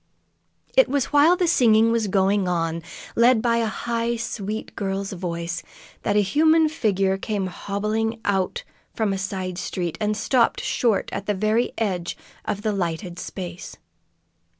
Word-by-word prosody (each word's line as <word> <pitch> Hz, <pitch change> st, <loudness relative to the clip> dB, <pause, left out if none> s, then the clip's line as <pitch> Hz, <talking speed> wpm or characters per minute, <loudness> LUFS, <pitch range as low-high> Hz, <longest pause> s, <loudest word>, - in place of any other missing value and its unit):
It -, -, +6 dB
was 280 Hz, 0 st, -1 dB
while 300 Hz, +5 st, +6 dB
the 360 Hz, 0 st, +1 dB
singing 230 Hz, -7 st, +5 dB
was 230 Hz, -2 st, +1 dB
going 195 Hz, 0 st, +2 dB
on, 165 Hz, -2 st, -1 dB, 0.3 s
led 235 Hz, 0 st, +5 dB
by 230 Hz, 0 st, +2 dB
a 230 Hz, -1 st, +1 dB
high, 235 Hz, +1 st, -1 dB
sweet 220 Hz, -2 st, -4 dB
girl's 195 Hz, -1 st, -2 dB
voice, 170 Hz, -2 st, -4 dB, 0.4 s
that 205 Hz, -, 0 dB
a 210 Hz, -, +4 dB
human 315 Hz, -, +4 dB
figure 195 Hz, -, +1 dB
came 205 Hz, -2 st, -2 dB
hobbling 215 Hz, +4 st, -2 dB
out 200 Hz, -, 0 dB, 0.3 s
from 215 Hz, -4 st, 0 dB
a 195 Hz, -, -3 dB
side 185 Hz, -2 st, -4 dB
street, 175 Hz, -3 st, -3 dB
and 210 Hz, 0 st, 0 dB
stopped 240 Hz, +2 st, +2 dB
short 230 Hz, -5 st, 0 dB
at -, -, -4 dB
the 210 Hz, -, +1 dB
very 215 Hz, +4 st, +1 dB
edge 185 Hz, -6 st, -2 dB, 0.3 s
of 205 Hz, 0 st, -3 dB
the 215 Hz, -, +1 dB
lighted 175 Hz, -1 st, -3 dB
space. 180 Hz, -1 st, -7 dB
210 Hz, 150 wpm, -23 LUFS, 190-230 Hz, 0.4 s, It